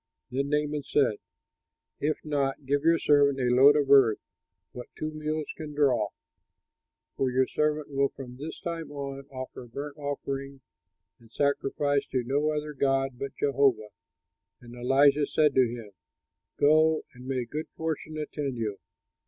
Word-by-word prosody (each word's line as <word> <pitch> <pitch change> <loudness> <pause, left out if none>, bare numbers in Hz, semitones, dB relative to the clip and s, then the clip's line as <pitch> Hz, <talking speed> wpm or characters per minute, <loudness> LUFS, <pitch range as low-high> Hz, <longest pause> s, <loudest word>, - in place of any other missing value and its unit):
Then 140 +2 -1
Naaman 150 0 0
said, 135 -6 +1 0.8
"If 150 +2 -2
not, 140 -3 0
at - - -31
least - - -22
give 140 +1 +2
your 165 +1 +5
servant 145 -3 +3
a 125 -1 +2
load 140 +4 +7
of 145 -2 +1
earth, 130 -6 +6 0.5
what 125 -1 -8
two 155 0 -3
mules 155 0 -3
can 150 -2 -8
draw, 130 -7 +3 1.1
for 135 - 0
your 130 +1 +2
servant 150 +1 -1
will 140 0 +2
from 125 -2 -10
this 150 +4 -7
time 165 -3 -5
on 140 -1 -6
offer 130 -2 -8
burnt 140 +5 -7
offering 140 -1 -5 0.6
and 115 -2 -20
sacrifice 140 +1 0
to 130 -2 -1
no 140 +5 0
other 150 0 -3
god 135 -2 0
but 140 -1 -5
Jehovah." 135 -6 +2 0.7
And 120 0 -13
Elisha 140 +4 +3
said 150 -2 +3
to 130 -3 +4
him, 115 -3 -8 0.7
"Go, 155 +2 +4
and 125 0 -12
may 130 -2 -1
good 150 +6 -5
fortune 155 -1 -4
attend 145 -3 -4
you." 105 -3 -3
140 Hz, 155 wpm, -28 LUFS, 130-150 Hz, 1.1 s, load